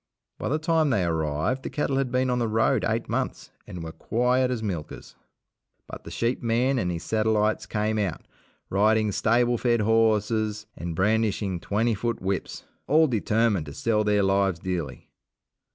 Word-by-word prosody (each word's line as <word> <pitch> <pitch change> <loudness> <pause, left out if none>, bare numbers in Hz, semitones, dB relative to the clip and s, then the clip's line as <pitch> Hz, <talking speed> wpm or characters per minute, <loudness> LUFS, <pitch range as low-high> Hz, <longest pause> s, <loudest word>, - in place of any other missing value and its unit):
By - - -2
the 150 - +1
time 160 -1 +1
they 105 -8 +1
arrived, 80 - -1
the - - -5
cattle 140 -2 -1
had 135 -2 -1
been 130 0 +1
on 125 - 0
the 120 - 0
road 110 +1 +2
eight - - -1
months, - - -3 0.2
and 90 -2 -7
were 80 - -6
quiet 125 +7 +1
as 120 -3 -3
milkers. 85 -8 -6 0.7
But - - -10
the - - -7
sheep 120 +2 -1
man 125 +3 +1
and 90 - -1
his 85 -2 -4
satellites 110 -1 +1
came 110 +1 -1
out, 100 -3 -3 0.5
riding 110 +2 +3
stable 120 +3 +2
fed 120 -2 +2
horses 110 -1 +1
and 85 -1 -5
brandishing 105 -1 0
twenty 110 +6 0
foot 115 +3 -2
whips, 95 0 -3 0.2
all 155 +3 +5
determined 110 - +1
to 70 - -8
sell 110 -2 +1
their 105 -1 +2
lives 95 -2 +2
dearly. 85 -3 -5
110 Hz, 170 wpm, -25 LUFS, 95-120 Hz, 0.7 s, all